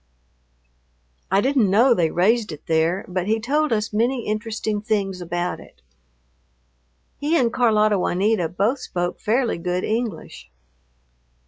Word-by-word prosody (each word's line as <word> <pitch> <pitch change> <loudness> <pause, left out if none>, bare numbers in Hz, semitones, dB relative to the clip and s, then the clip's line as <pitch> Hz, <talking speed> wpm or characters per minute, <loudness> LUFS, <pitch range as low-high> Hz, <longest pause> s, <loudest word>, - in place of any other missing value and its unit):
I 195 +1 +3
didn't 260 -4 +2
know 235 +6 +5
they 170 -7 +1
raised 210 +5 +1
it 150 -1 -10
there, 165 +3 +1
but 185 0 -3
he 220 +1 +1
told 295 +6 0
us 215 -1 -1
many 235 +3 0
interesting 215 0 -3
things 200 -4 -2
about 175 +1 -3
it. - - -17 1.4
He 310 +4 +1
and 240 -5 +1
Carlota 215 -4 +3
Juanita 185 -1 +1
both 205 - 0
spoke 175 -7 -3
fairly 230 -3 0
good 180 +1 -2
English. 220 - -4
210 Hz, 130 wpm, -22 LUFS, 180-235 Hz, 1.4 s, know